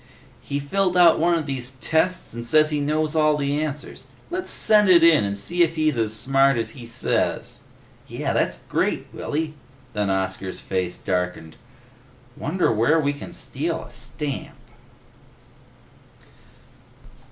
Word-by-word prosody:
He 140 - -3
filled 180 +5 0
out 175 -2 +6
one 170 +1 +3
of 160 - -3
these 130 -2 -4
tests 165 +2 0
and 120 0 -6
says 155 +6 +4
he 150 - 0
knows 155 +1 0
all 155 -1 +3
the 145 +1 -1
answers. 150 -1 -6 0.2
Let's 365 +1 -3
send 210 -2 +3
it 170 -2 +7
in 165 -7 +6
and 100 0 -2
see 175 - -1
if 165 -1 +3
he's 155 -2 +1
as 110 -2 0
smart 135 +4 +2
as 115 - -2
he 120 -4 -10
says!" 115 - -1 0.5
"Yeh! - - -2
That's - - 0
great, - - -1
Willy!" 155 +1 -3 0.4
Then 105 -2 -1
Oscar's 95 0 -2
face 90 -2 -3
darkened. 90 -3 -3 0.8
"Wonder 170 +2 0
where 120 +9 +3
we 145 -2 +1
can 145 - -9
steal - - -3
a - - -14
stamp?" 145 -3 -5
145 Hz, 145 wpm, -23 LUFS, 115-160 Hz, 0.8 s, it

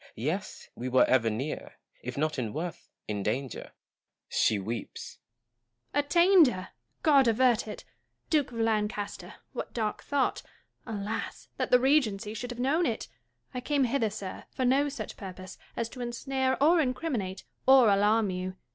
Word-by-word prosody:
Yes, - - -3
we 125 +2 -5
were 130 0 +5
ever 120 -3 +3
near 130 +8 -4 0.2
— - - -61
if - - -6
not 155 -1 0
in 115 -4 -3
worth, 165 +2 -5 0.2
in 105 -1 -2
danger. 125 +5 -3 0.6
She 110 - +2
weeps. 110 +3 -6 0.7
Joanna. 290 - +2
Attainder! 340 - +5 0.4
God 280 -5 +5
avert 235 0 +3
it! 210 - -7 0.5
Duke 295 -5 +2
of 235 - -8
Lancaster, 210 -2 -1 0.2
what - - -6
dark 215 -3 -1
thought 285 -2 0 0.3
— - - -45 0.2
alas! 210 +2 -5
that - - -1
the 250 - +6
Regency 245 -7 +2
should 245 +2 -5
have 245 -1 -7
known 300 +7 +2
it! 225 - -3 0.4
I 250 - -3
came 285 +1 +1
hither, 245 -2 +1
sir, 200 -2 -7
for 260 - -2
no 275 +3 +3
such 285 - -6
purpose 185 -1 -9 0.2
as 230 - -1
to 250 +1 -9
ensnare 260 +2 -1
or 330 +2 +6
incriminate 250 - -2 0.2
or 265 -3 +8
alarm 205 +1 +3
you. 185 0 -4
225 Hz, 160 wpm, -29 LUFS, 185-265 Hz, 0.7 s, or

